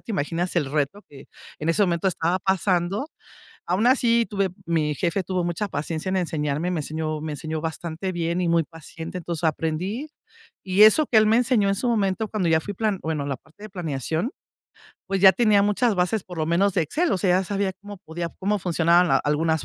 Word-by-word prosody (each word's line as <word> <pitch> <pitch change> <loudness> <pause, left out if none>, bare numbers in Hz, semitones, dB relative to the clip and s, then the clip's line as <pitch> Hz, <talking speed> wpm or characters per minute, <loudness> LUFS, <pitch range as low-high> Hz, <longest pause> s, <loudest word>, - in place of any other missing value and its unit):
te - - -10
imaginas 175 +1 -2
el 145 -5 0
reto 155 +7 -1
que, 140 -1 -14 0.3
en 155 - -3
ese 185 +5 +3
momento, 175 0 +1
estaba 175 +1 0
pasando. 190 - 0 0.6
Aún 185 +7 +1
así 235 -3 +3
tuve 195 -2 -1 0.2
mi 155 -3 0
jefe 185 +3 -1
tuvo 180 0 -2
mucha 175 +4 -2
paciencia 155 +3 -4
en 190 - 0
enseñarme, 155 0 -1
me 170 -4 -1
enseñó 155 0 -3
me 155 -1 -4
enseñó 155 +1 -4
bastante 165 +3 -4
bien 170 +1 -1
y 170 - 0
muy 165 -1 +3
paciente. 165 +3 -8
Entonces, 170 -1 -5
aprendí. 165 - -2 0.6
Y 190 +2 +3
eso 235 +8 +7
que 225 - +1
él 215 - +5
me 220 +2 +4
enseñó, 235 -5 +2
en - - +2
su 240 +5 -1
momento, 215 -1 0
cuando 190 -6 -1
ya 160 0 +4
fui 205 +3 -6
plan 210 -2 -1
bueno 155 -3 -2
la 135 -2 -2
parte 160 +9 -22
de 215 - -9
planeación, 165 - -3 0.8
pues, 195 -1 -1
ya 190 -1 +8
tenía 210 -1 +3
muchas 210 +3 +2
bases 180 +3 0
por 180 -2 -9
lo 155 - 0
menos 185 +4 +2
de 180 - +2
Excel, 320 - 0
o 190 - +1
sea, 180 -1 +3
ya - - -3
sabía 195 0 -1
cómo 205 -2 -9
podía, 170 +1 -5
cómo 205 +2 0
funcionaban 175 0 +3
la 135 - +4
algunas 160 +1 0
180 Hz, 210 wpm, -24 LUFS, 160-200 Hz, 0.8 s, ya